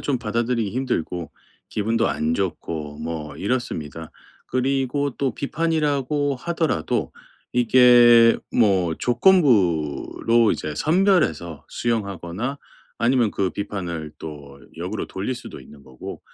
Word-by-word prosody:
좀 140 -3 -1
받아들이기 115 -1 -1
힘들고 90 -9 -3 0.4
기분도 115 +2 0
안 80 +1 -1
좋고 80 -5 -4
뭐 80 -3 -5
이렇습니다. 80 - -3 0.4
그리고 135 +2 0
또 135 -4 -1
비판이라고 145 -3 0
하더라도 155 - -1 0.4
이게 120 -1 +6
뭐 95 -7 +2
조건부로 115 - +2
이제 75 -1 -4
선별해서 155 - +1
수용하거나 105 +2 -3 0.4
아니면 120 -2 +2
그 95 -2 -1
비판을 85 -7 -5
또 70 -3 -9 0.2
역으로 - - -4
돌릴 100 +7 -4
수도 - - -10
있는 70 -2 -15
거고 65 -1 -9
115 Hz, 260 characters per minute, -22 LUFS, 85-130 Hz, 0.4 s, 이게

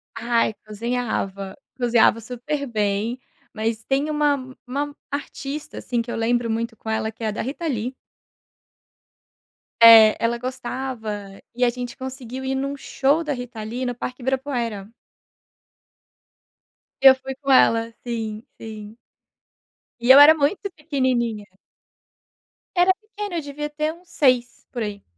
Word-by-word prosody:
Ai, 230 -1 +1
cozinhava, 210 -3 -3 0.2
cozinhava 235 -2 +4
super 255 +5 -4
bem, 215 +2 -1 0.3
mas 225 0 -2
tem 275 +5 0
uma 295 -1 +2 0.3
uma 285 +3 -3
artista, 285 +1 -6
assim, 240 -2 -2
que 235 - -6
eu - - -3
lembro 235 +1 0
muito 230 +1 -2
com 220 - -8
ela, 220 0 -1
que 225 +1 -11
é - - 0
a 215 - 0
da - - -4
Rita 290 +7 -5
Lee. 250 -1 -2 1.8
É, 225 -2 +9
ela 235 +1 +1
gostava 235 -5 -5
e 250 - 0
a 245 - +5
gente 245 0 -6
conseguiu 260 -1 -7
ir 265 - -1
num 275 +1 -2
show 280 +4 +1
da 300 - -2
Rita 245 -3 -7
Lee 245 +4 -4
no 245 -1 -2
parque 250 +1 -6
Ibirapuera. 240 -6 -2 2.1
Eu 265 -1 +9
fui 265 0 -7
com 275 0 -2
ela. 230 -3 +4
Sim, 225 -2 -4 0.2
sim. 215 -1 -9 1.0
E 240 - -1
eu 270 - +10
era 295 +2 +10
muito 310 +8 0
pequenininha. 255 -8 -1 1.3
Era 360 +1 +5
pequena, 415 -2 -7
eu - - -1
devia 295 +1 -5
ter 305 +1 -2
uns 350 +1 -20
6, 255 -7 +1
por 245 - -4
aí. 205 -2 -6
245 Hz, 140 wpm, -23 LUFS, 225-275 Hz, 2.1 s, eu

